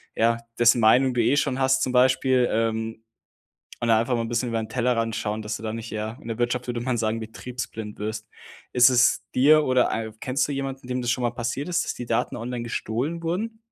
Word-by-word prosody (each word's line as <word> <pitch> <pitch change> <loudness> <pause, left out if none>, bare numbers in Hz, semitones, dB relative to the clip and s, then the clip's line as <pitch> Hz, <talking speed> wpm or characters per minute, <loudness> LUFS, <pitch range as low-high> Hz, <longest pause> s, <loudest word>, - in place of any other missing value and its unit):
ja, 115 +1 +2 0.2
dessen 120 0 +5
Meinung 125 +4 +5
du 120 - +1
eh 140 +5 +3
schon 135 -2 0
hast 130 0 +2
zum 130 - -1
Beispiel, 130 0 +3
ähm, 115 0 -1 0.8
und 120 - 0
einfach 115 +3 +3
mal 115 - 0
'n 115 - -4
bisschen 120 +1 -1
über 115 - -1
den 110 - -7
Tellerrand 115 -2 0
schauen, 105 +1 -3
dass 110 +1 -4
du - - -12
da 110 -1 -3
nicht 115 0 -6
ja, 110 +2 -4
in 115 - -9
der 115 - -3
Wirtschaft 120 +1 -1
würde 120 -1 -2
man 125 +1 -1
sagen 110 0 -1
betriebsblind 110 -2 -7
wirst. 110 +1 -5 0.4
Ist 125 +1 +6
es 125 0 +4
dir 150 +4 +5
oder 130 -1 +2
ei 110 0 -3
kennst 130 +2 0
du 145 - -3
jemanden, 135 -2 -5
dem 125 0 -2
das 120 -1 0
schon 130 - -1
mal 120 - +1
passiert 120 +4 -3
ist, 175 -1 0
dass - - -3
die 120 - -7
Daten 115 0 -1
online 120 +1 -4
gestohlen 120 +7 -3
wurden? 205 +7 -3
120 Hz, 230 wpm, -24 LUFS, 115-130 Hz, 0.8 s, Ist